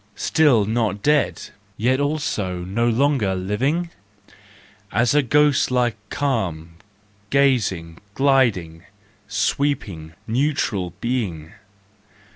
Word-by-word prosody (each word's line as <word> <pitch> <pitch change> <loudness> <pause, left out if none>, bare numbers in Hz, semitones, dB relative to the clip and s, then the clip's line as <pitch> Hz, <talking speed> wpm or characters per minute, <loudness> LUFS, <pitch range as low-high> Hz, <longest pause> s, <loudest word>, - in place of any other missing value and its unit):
Still 140 -10 +3
not 110 -2 -1
dead, 150 -1 +1 0.3
yet 130 +4 +1
also 145 - -2
no 115 +6 0
longer 120 -5 +1
living? 135 - -1 1.0
Asa 125 +5 +3
ghost 145 +2 +3
like, 125 -3 +1
calm, 85 - -2 0.5
gazing, 105 -12 +1 0.2
gliding, 115 - +1 0.4
sweeping, 105 - -2
neutral 115 - -1
being? 100 -11 -3
120 Hz, 85 wpm, -21 LUFS, 95-140 Hz, 1.0 s, Still